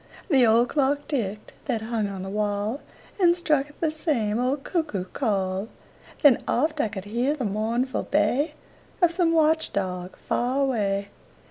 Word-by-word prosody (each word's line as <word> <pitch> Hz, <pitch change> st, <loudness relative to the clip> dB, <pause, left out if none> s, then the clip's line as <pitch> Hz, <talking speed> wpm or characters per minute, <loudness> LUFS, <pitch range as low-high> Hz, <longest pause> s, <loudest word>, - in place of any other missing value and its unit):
The 260 Hz, -4 st, +6 dB
old 230 Hz, +2 st, +4 dB
clock 285 Hz, 0 st, +1 dB
ticked 215 Hz, -7 st, -3 dB
that 230 Hz, -5 st, -1 dB
hung 220 Hz, -2 st, -1 dB
on 195 Hz, -2 st, -6 dB
the 190 Hz, -, -5 dB
wall 210 Hz, +4 st, -1 dB, 0.4 s
And 345 Hz, -2 st, +5 dB
struck 300 Hz, -5 st, +1 dB
'th 295 Hz, -, -19 dB
the 320 Hz, -2 st, +2 dB
same 240 Hz, -9 st, 0 dB
old 265 Hz, +3 st, 0 dB
cuckoo 295 Hz, -, -2 dB
call; 195 Hz, -3 st, -1 dB, 0.5 s
Then 280 Hz, -5 st, +6 dB
oft 305 Hz, +3 st, +1 dB
I -, -, +1 dB
could 200 Hz, -2 st, -7 dB
hear 240 Hz, +7 st, 0 dB
the 265 Hz, -5 st, -3 dB
mournful 225 Hz, +5 st, -1 dB
bay 250 Hz, +9 st, +1 dB, 0.4 s
Of 350 Hz, -3 st, +4 dB
some 340 Hz, -1 st, +2 dB
watch 320 Hz, 0 st, +2 dB
dog 180 Hz, -2 st, -3 dB
far 250 Hz, +3 st, 0 dB
away. 200 Hz, -6 st, 0 dB
240 Hz, 160 wpm, -25 LUFS, 205-295 Hz, 0.5 s, The